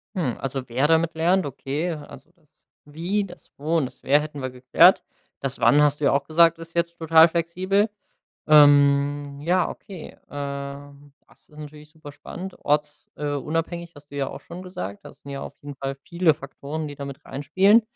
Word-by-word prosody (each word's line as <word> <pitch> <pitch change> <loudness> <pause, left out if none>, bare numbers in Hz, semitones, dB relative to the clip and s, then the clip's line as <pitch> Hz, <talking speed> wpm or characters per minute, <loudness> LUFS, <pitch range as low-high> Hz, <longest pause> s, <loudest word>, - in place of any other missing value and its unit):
Mhm, 150 -11 -1
also, 135 -1 -4
wer 130 +5 +1
damit 165 +1 +2
lernt, 175 +3 +2
okay. 145 +5 -3
Also, 150 -2 -11
das - - -33 0.4
„Wie”, 175 +8 -2
das 180 - -14
„Wo” 155 +4 0
und 155 - +1
das 125 - -12
„Wer” 145 +2 +4
hätten 150 -2 -7
wir 130 - -3
geklärt. 130 +8 +4 0.4
Das 135 0 -4
„Wann” 145 - +5
hast 145 -1 +3
du 150 - 0
ja - - +4
auch 140 - +1
gesagt, 165 +1 +4
ist 165 0 -11
jetzt 170 0 -1
total 160 0 +6
flexibel. 185 +5 0 0.6
Ähm, 145 -1 +5
ja, 175 +4 +1
okay. 185 -5 -9 0.2
Äh, 140 0 -6 0.4
das - - -22
ist 150 - -17
natürlich 150 0 -11
super 155 -2 -12
spannend. 185 +5 -8
Orts 150 0 -1
äh, 150 -1 -3
unabhängig 165 +4 -3
hast 145 0 -16
du 145 - -9
ja 135 -1 -1
auch - - -9
schon 175 +2 -10
gesagt. 100 - -7
Das - - -13
sind 140 - -10
ja 135 - -5
auf - - -8
jeden 145 0 -8
Fall 135 0 -4
viele 170 -2 +2
Faktoren, 145 +2 -6
die 145 - -8
da 140 - -6
mit 140 -1 -9
reinspielen. 190 - +3
150 Hz, 195 wpm, -24 LUFS, 140-170 Hz, 0.6 s, total